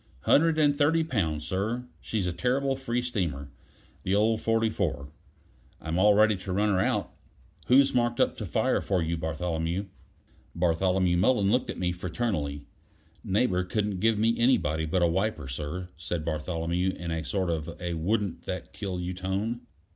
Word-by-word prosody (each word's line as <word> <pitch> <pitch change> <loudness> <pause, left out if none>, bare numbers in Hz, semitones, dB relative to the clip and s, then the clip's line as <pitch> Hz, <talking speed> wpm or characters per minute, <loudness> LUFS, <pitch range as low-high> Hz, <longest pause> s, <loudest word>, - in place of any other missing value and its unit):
"Hundred 160 - +4
and 145 -2 +4
thirty 160 +3 +3
pounds, 80 - -1
sir. 105 +9 -2 0.2
She's 105 -4 -2
a 90 - -1
terrible 135 +8 0
free 125 -2 -2
steamer, 85 - -3 0.5
the 95 - 0
old 110 +2 +2
44. 110 -10 0 0.7
I'm 80 +3 -2
all 105 +1 +6
ready 110 0 +5
to 95 +1 -6
run 105 +3 +2
her 95 -2 +2
out." - - 0 0.6
"Who's 135 +2 +5
marked 120 -1 +1
up - - +2
to - - -4
fire - - +1
for 95 -4 0
you, 80 +1 -1
Bartholomew?" 80 +3 -2 0.7
Bartholomew 90 +1 +2
Mullen 100 +1 +3
looked 125 +3 +1
at - - -4
me 90 -1 0
fraternally. 85 -5 -3 0.6
"Neighbor 95 -2 +1
couldn't 100 0 -2
give 110 +2 +3
me 115 +2 +3
anybody 80 - +2
but 90 +3 +1
a - - +5
wiper, 95 -3 -1
sir," 75 +7 -5
said 85 -1 -4
Bartholomew, 85 +3 -1
in 85 -1 -5
a 80 -1 -2
sort 95 +2 -1
of 80 +1 -4
a 90 -1 -3
wouldn't 100 +4 -1
that - - -5
kill 95 -2 -4
you 90 +1 -3
tone. 95 +6 -2
95 Hz, 165 wpm, -28 LUFS, 85-110 Hz, 0.7 s, all